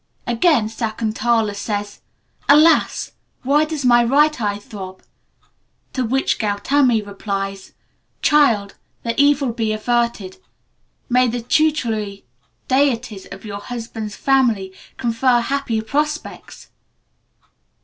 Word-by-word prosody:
Again, 240 +1 +2
Sakuntala 220 0 -1
says: 205 0 -4 0.5
"Alas! 305 +3 +4 0.3
why 290 +4 +3
does 305 -4 -4
my 240 -1 +5
right 290 +3 +3
eye 205 -1 -1
throb?" 190 -2 -10 0.9
to 255 - -1
which 265 +3 0
Gautami 225 +3 +2
replies: 195 -1 -5 0.5
"Child, 230 -10 +3 0.3
the 230 - -1
evil 285 -3 +3
be 225 -2 -1
averted. 235 -3 -1 0.7
May 250 +1 +3
the 240 +1 -2
tutelary 225 - 0 0.4
deities 250 -6 0
of - - -10
your 200 -1 -6
husband's 225 -2 -6
family 235 -9 +1 0.2
confer 240 +1 +2
happy 240 -2 -1
prospects!" 300 +7 -4
235 Hz, 100 wpm, -20 LUFS, 210-270 Hz, 0.9 s, my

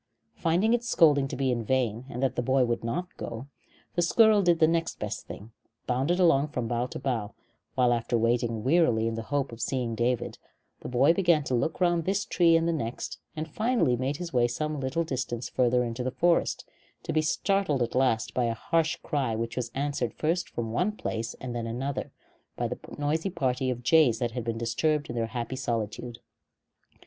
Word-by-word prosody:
Finding 180 +7 +2
its 240 0 0
scolding 145 -9 +4
to - - -5
be 130 -1 0
in 120 -2 -1
vain, 120 -1 0
and 125 +1 -4
that 135 -1 +1
the - - 0
boy 130 +1 +3
would 120 -1 -2
not 175 +11 -3
go, 115 +2 -6 0.5
the 175 - +1
squirrel 215 +4 +5
did 175 -3 +3
the 160 - +5
next 165 0 0
best - - -5
thing 110 +3 -9 0.3
bounded 135 +8 0
along 150 -5 +4
from 125 -5 -3
bough 120 +1 -1
to - - -7
bough; 120 -6 -3 0.4
while, 125 -1 +4
after 120 0 0
waiting 115 -1 0
wearily 130 -6 +3
in 115 - -1
the 115 - -3
hope 140 +3 -2
of 115 - -9
seeing 125 -3 -1
David, 120 +2 -1 0.4
the - - -7
boy 130 +6 +4
began 170 -4 +3
to 130 - -3
look 125 +6 0
round 175 -2 +2
this 200 +3 0
tree 170 -5 +4
and 165 0 0
the 170 - +1
next, 120 -6 -4 0.2
and 155 0 -4
finally 215 - +1
made 130 +4 -2
his 175 -1 -6
way 120 -1 +4
some 150 +5 -3
little 135 +5 -1
distance 130 -5 -3
farther 125 0 +2
into 120 +1 -3
the 130 - 0
forest, 170 +5 +1 0.4
to - - -3
be 155 - +3
startled 155 -3 +1
at 120 - -4
last 115 -4 +1
by 125 - +1
a 115 -1 -1
harsh 165 +7 +1
cry 135 -7 -1
which 115 +1 -3
was 125 -2 -2
answered 140 -4 -2
from - - -39
first 175 +1 -4
one 120 - 0
place 115 - -4
and 125 -2 -6
then 115 -1 -3
another 130 +4 -3 0.5
by - - 0
the - - -5 0.2
noisy 155 +5 0
party 130 -6 -1
of 125 -1 -3
jays 145 -5 +5
that 120 0 -1
had 120 0 -4
been 115 0 -3
disturbed 145 +5 0
in - - -6
their 115 -1 0
happy 120 +2 -4
solitude. 120 -1 -3
130 Hz, 205 wpm, -28 LUFS, 120-160 Hz, 0.5 s, squirrel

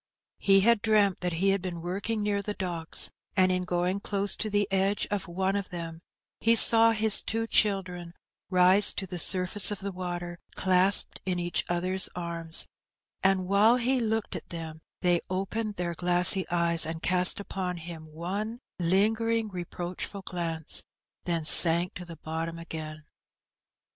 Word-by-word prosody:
He 195 -1 +3
had 230 +1 +2
dreamt 210 -4 0
that 180 -1 -3
he 185 +4 0
had 195 -1 -2
been 180 -2 -7
working 200 +5 -5
near 205 -1 -2
the 205 +1 -6
docks, 170 -3 -1 0.3
and 185 0 +2
in 180 0 -3
going 180 +2 -2
close 200 0 -2
to 215 - -4
the 205 -1 -1
edge 195 +1 -1
of 200 -2 -4
one 190 +3 -3
of 200 -1 -5
them 165 -2 -9 0.4
he 230 +1 +2
saw 230 0 +6
his 220 -1 +5
two 225 +1 -3
children 185 -6 -2 0.3
rise 185 +2 +4
to 195 - -5
the 180 -1 -8
surface 185 +2 +3
of 205 - -5
the 200 0 -6
water 175 -1 -7 0.2
clasped 185 +1 +2
in 185 -1 -4
each 175 0 -3
other's 185 +2 0
arms; 170 -2 +2 0.6
and 190 -1 0
while 205 +4 +3
he 250 +1 -1
looked 225 -2 -4
at - - -10
them, 160 -2 -9 0.2
they 175 -2 +1
opened 200 +3 -5
their 175 -2 -5
glassy 180 +2 +5
eyes 170 -1 +1
and 160 0 -6
cast 180 +3 +4
upon 185 -3 -6
him 165 -1 -11
one 195 +9 -7 0.2
lingering, 220 +5 -1
reproachful 180 +1 -8
glance, 165 -4 +4 0.4
then 170 -3 -3
sank 170 +2 +6
to 180 - -10
the 165 -2 -12
bottom 165 +2 -7
again. 155 -2 -9
185 Hz, 160 wpm, -26 LUFS, 175-200 Hz, 0.6 s, saw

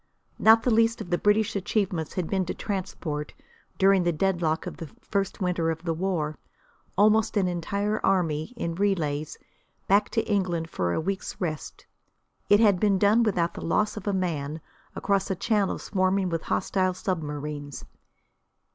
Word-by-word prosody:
Not 225 +1 +6
the 245 - +2
least 230 +1 +3
of 190 -5 -7
the 175 - +2
British 210 +1 +2
achievements 190 -5 -1
had 180 -3 -2
been 190 -1 0
to - - -3
transport, 175 -7 -4 0.4
during 195 0 +5
the 175 0 +2
deadlock 170 -2 0
of - - -6
the 165 - -7
first 200 0 -2
winter 180 -3 0
of 165 +1 -3
the 165 -2 -1
war, 160 -5 -2 0.6
almost 215 +2 +4
the 205 - +3
entire 200 +4 -1
army, 160 -4 +1
in 170 -7 -2
relays, 165 -6 -1 0.5
back 200 +2 +3
to 225 - 0
England 175 -5 -1
for 90 -1 -1
a - - 0
week's 195 +4 -4
rest. 155 -5 -5 0.6
It 205 - +6
had 205 -5 +4
been 200 -1 +3
done 205 +4 +4
without 180 -7 +1
the - - -7
loss 210 +5 +1
of 210 -1 -7
a - - +2
man, 160 -5 -2 0.4
across 200 -1 0
a 190 - 0
channel 205 +1 0
swarming 185 -1 0
with 165 -1 -2
hostile 185 - 0
submarines. 150 -6 -4
185 Hz, 165 wpm, -26 LUFS, 165-205 Hz, 0.6 s, Not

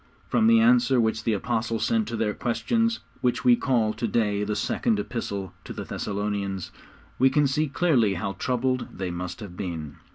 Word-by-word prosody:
From 225 - +3
the 230 0 +6
answer 240 - +4
which 110 -1 0
the 115 - +2
Apostle 115 +2 -1
sent 225 -2 +1
to - - -3
their 110 -2 0
questions 230 - 0 0.2
which 125 -1 0
we 125 -1 +7
call 120 -5 +1
to 115 - -2
day 105 -2 +1
the 105 0 -2
Second 225 - 0
Epistle 100 - -4
to - - -7
the - - -5
Thessalonians 100 -2 -3 0.5
we 130 +1 +6
can 145 +2 +3
see 150 +3 +1
clearly 135 - +2
how 95 +3 -3
troubled 130 +4 -1
they 95 -2 -3
must 90 +3 -5
have 100 -4 -8
been. 80 -6 -5
115 Hz, 185 wpm, -26 LUFS, 100-135 Hz, 0.5 s, we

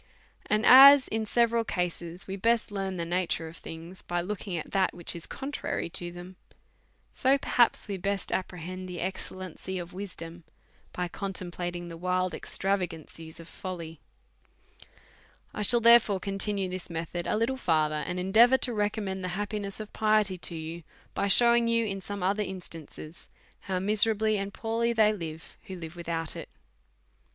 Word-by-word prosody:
And 215 +2 +1
as 275 +1 +10
in 220 0 -2
several 235 0 +2
cases 175 -3 -4
we 190 - -5
best 230 +3 +1
]earn 195 -2 -3
the 170 - -2
nature 170 -1 -1
of 160 +1 -10
things 165 +3 -9
by 175 0 -2
looking 185 0 -4
at 160 - -6
that 190 -2 +1
which 175 -1 -4
is 170 - -7
contrary 270 -10 -4
to 175 0 -2
them^ 175 +1 -10 0.8
so 270 +1 +3
perhaps 245 -3 +2
we 200 -2 -3
best 195 +1 -2
com - - +2
prehend 185 +1 -7
the 180 -1 -6
excellency 185 0 -5
of 175 -1 -7
wisdom 175 -3 -7 0.5
by 180 0 -3
contemplating 175 -2 -4
the 165 -1 -8
wild 180 0 0
extravagances 165 -5 -3
of 165 - -11
folly. 170 -5 -7 1.5
I - - -4
shall, 235 +4 +5
therefore, 230 -4 +6
continue 195 0 -1
this 185 -1 -5
method 170 +1 -4
a - - +1
little 230 +4 +1
fur 160 - +2
ther, 150 0 -2
and 175 - -4
endeavour 225 +8 +5
to 245 - -1
recommend 205 -3 -2
the - - -2
happiness 205 -1 -4
of 215 -1 -8
piety 215 -3 +2
to 170 - -3
you, 165 +1 -6 0.3
by 200 - 0
shewing 235 +3 +5
you, 230 0 +2
in 195 -2 -3
some 200 +1 -6
othei* 200 +2 0
instan 170 -5 -7
ces, 155 +2 -12 0.3
how 190 -2 -3
miserably 215 +2 +2
and 195 0 -4
poorly 230 +2 -1
they 215 -2 +4
live 160 -5 -8
who 190 - -7
live 165 -1 -8
with 170 -1 -8
out 165 -1 -1
it. - - -7
190 Hz, 170 wpm, -28 LUFS, 175-215 Hz, 1.5 s, as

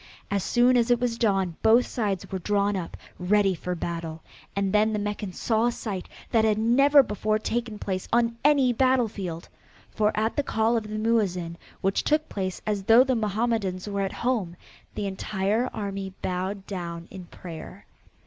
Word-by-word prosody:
As 200 -2 0
soon 245 +3 +4
as 235 0 +2
it 240 -1 +4
was 245 -2 0
dawn 195 -7 +1
both 230 +3 +5
sides 205 -6 -3
were 190 - -2
drawn 205 +2 +1
up 180 -3 -5 0.2
ready 195 +2 +3
for 180 +1 -4
battle 165 -1 -5 0.3
and 200 0 0
then 215 +1 +3
the - - 0
Meccans 205 -2 -4
saw 225 0 +2
a - - +2
sight 200 -6 -5 0.2
that 225 -2 +4
had 215 -1 +3
never 275 +6 +5
before 215 -1 0
taken 230 0 -3
place 190 -2 -3
on 230 0 +2
any 275 -4 +4
battlefield 220 -10 0 0.4
for 210 0 +2
at 220 +1 0
the - - +4
call 225 -3 +1
of 220 -2 -1
the 215 - -4
Muezin, 200 -7 0 0.3
which 195 +1 +1
took 305 +1 +1
place 185 -2 -4
as 210 -2 -1
though 230 +4 +7
the 265 -1 0
Mohammedans 215 -4 -1
were 200 -1 -2
at 195 -1 -1
home, 210 -9 0 0.4
the 205 - -2
entire 200 +4 -1
army 195 -2 -4
bowed 190 +2 -3
down 170 -3 -6
in 185 -2 -9
prayer. 170 +2 -10
210 Hz, 175 wpm, -26 LUFS, 190-230 Hz, 0.4 s, though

